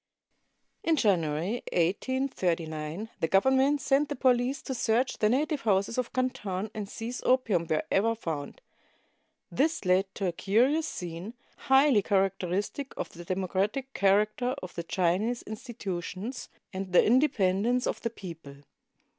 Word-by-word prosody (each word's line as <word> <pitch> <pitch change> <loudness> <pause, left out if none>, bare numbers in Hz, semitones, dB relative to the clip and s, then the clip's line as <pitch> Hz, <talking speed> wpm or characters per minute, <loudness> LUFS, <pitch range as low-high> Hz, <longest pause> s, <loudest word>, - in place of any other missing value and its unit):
] - - -48
In 325 - +5
January, 180 - +1
1839, 175 - -1
the 165 - +1
Government 265 - +3
sent 280 +2 +2
the 290 - -2
police 250 +1 +2
to 265 - -4
search 240 +1 0
the 210 - +3
native 290 +4 +1
houses 200 +2 +1
of 250 - -2
Canton 210 -6 -2
and 205 -2 -5
seize 235 +3 -5
opium 220 -10 +2
wherever 195 +8 +1
found. 165 - -5 0.9
This 305 -5 0
led 185 +2 +4
to 195 - -2
a 180 - +1
curious 250 - +2
scene, 175 +6 -6 0.3
highly 265 -4 +5
characteristic 195 +6 -1
of - - -3
the 175 - -11
democratic 195 +9 -2
character 215 +6 +2
of 180 - -7
the 170 - -4
Chinese 185 +8 0
institutions 215 0 -6 0.2
and 190 -1 -5
the - - +6
independence 240 -2 +2
of - - -2
the 230 - -1
people. 165 -10 -10
210 Hz, 135 wpm, -28 LUFS, 185-255 Hz, 0.9 s, the